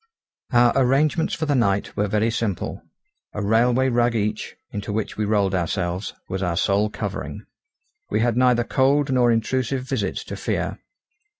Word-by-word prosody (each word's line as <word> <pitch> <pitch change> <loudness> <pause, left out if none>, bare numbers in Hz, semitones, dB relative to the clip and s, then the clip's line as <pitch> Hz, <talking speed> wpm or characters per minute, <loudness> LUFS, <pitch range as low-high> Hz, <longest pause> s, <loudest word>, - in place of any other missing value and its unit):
Our 120 -1 +5
arrangements 140 +5 +2
for 160 - -2
the 150 - +1
night 100 -6 +1
were 105 - 0
very 105 +3 +1
simple; 110 -5 -3 0.5
a 105 - -3
railway 120 +5 +3
rug 120 -1 +2
each, 105 0 -2 0.2
into 105 0 -4
which 110 +1 -3
we 105 - -1
rolled 100 -2 +1
ourselves, 90 +1 -2
was 95 +1 -4
our 85 -3 -1
sole 100 +4 +2
covering. - - -5 0.6
We - - +1
had 120 -1 +1
neither 125 -1 +3
cold 135 +3 +2
nor 125 -2 +4
intrusive 125 +3 0
visits 130 - -2
to - - -7
fear. - - -2
115 Hz, 160 wpm, -23 LUFS, 105-125 Hz, 0.6 s, Our